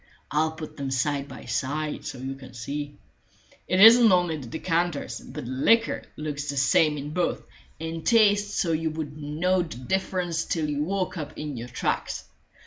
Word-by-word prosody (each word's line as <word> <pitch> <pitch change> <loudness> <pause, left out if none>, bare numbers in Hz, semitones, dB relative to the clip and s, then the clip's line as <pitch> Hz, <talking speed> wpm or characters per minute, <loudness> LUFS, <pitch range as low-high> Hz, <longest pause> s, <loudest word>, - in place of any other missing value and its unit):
I'll 155 +2 +1
put 160 -1 -9
them 140 -2 -3
side 140 +1 0
by 135 - -10
side, 150 +3 -2
so - - -5
you 130 +2 -4
can 130 -2 -12
see. 145 +5 -5 0.7
It 185 - +1
isn't 225 +1 +9
only 175 -3 +3
the 140 -5 -7
decanters, 165 -4 -1
but - - -8
the 125 - -5
liquor 225 - +3 0.2
looks 150 -1 -4
the 140 - -3
same 150 +3 +4
in 145 +1 -5
both, 180 0 0 0.4
and 165 0 -5
tastes 205 -3 +4
so 170 - +1
you 160 0 0
wouldn't 155 -1 -6
know 170 +6 +1
the 165 -8 -6
difference 175 +3 -1
till 160 -3 -1
you 145 0 -1
woke 185 +2 -2
up 150 -2 -7
in 150 -2 -4
your 120 0 -6
tracks. - - -2
155 Hz, 180 wpm, -26 LUFS, 140-175 Hz, 0.7 s, isn't